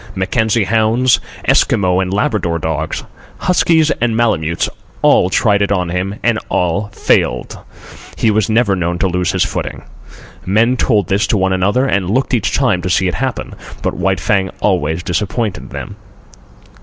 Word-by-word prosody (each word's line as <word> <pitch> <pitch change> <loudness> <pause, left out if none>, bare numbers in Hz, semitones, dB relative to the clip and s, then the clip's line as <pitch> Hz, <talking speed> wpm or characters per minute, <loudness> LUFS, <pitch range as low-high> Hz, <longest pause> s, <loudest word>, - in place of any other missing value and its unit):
Mackenzie 110 +3 +1
hounds, 115 +4 +2 0.3
Eskimo 90 -1 +3
and 95 -1 -2
Labrador 100 - 0
dogs, 80 -1 -3 0.3
huskies 165 -3 +2
and 115 -2 +1
Malemutes—all 85 -9 +1
tried 100 -1 +2
it 100 - 0
on 90 -3 0
him, 90 +3 -2
and 115 -2 +2
all 90 +4 0
failed. - - 0 0.6
He 110 - +2
was 105 0 +1
never 110 -3 +2
known 85 -1 -2
to 95 - +1
lose 90 -1 0
his - - +1
footing. - - -5 0.6
Men 115 +6 +2
told 105 -7 +1
this 100 +3 +1
to 110 - +1
one 95 0 +1
another, 100 +8 +1
and 95 -8 0
looked 130 +5 0
each 110 -5 +1
time 120 -10 +1
to 90 - -3
see 95 +1 +2
it 90 - -1
happen; 130 -2 -3 0.3
but - - 0
White 95 -2 0
Fang 95 0 +1
always 85 -4 0
disappointed 105 +4 -2
them. - - -7
100 Hz, 155 wpm, -16 LUFS, 90-115 Hz, 0.6 s, Eskimo